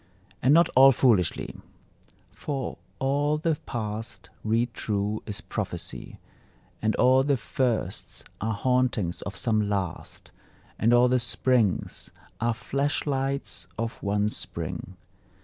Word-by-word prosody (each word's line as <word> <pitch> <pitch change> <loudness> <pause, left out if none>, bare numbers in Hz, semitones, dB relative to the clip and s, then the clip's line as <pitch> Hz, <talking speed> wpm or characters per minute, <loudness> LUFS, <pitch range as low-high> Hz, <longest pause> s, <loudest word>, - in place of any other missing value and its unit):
And 130 - +4
not 170 +3 +6
all 135 +1 +8
foolishly: 110 - +2 0.8
For 135 -4 -4 0.2
all 145 +3 +1
the 160 0 +1
past, 110 -1 -5
read 115 +2 +1
true, 105 0 -1
is 105 - -3
prophecy, - - -5 0.6
And 110 0 +1
all 130 +1 +5
the 140 -1 +2
firsts 115 -4 -2 0.2
are 110 +1 -1
hauntings 125 -6 +1
of 100 -1 -6
some 110 -4 +1
Last, 95 -4 -4 0.5
And 115 - +3
all 120 +1 +6
the 125 0 +3
springs 115 -3 +1 0.3
are 115 0 +1
flash 140 +5 -1
lights 135 - -2
of 115 0 -4
one 105 +1 +1
Spring. - - -6
120 Hz, 120 wpm, -27 LUFS, 105-135 Hz, 0.8 s, all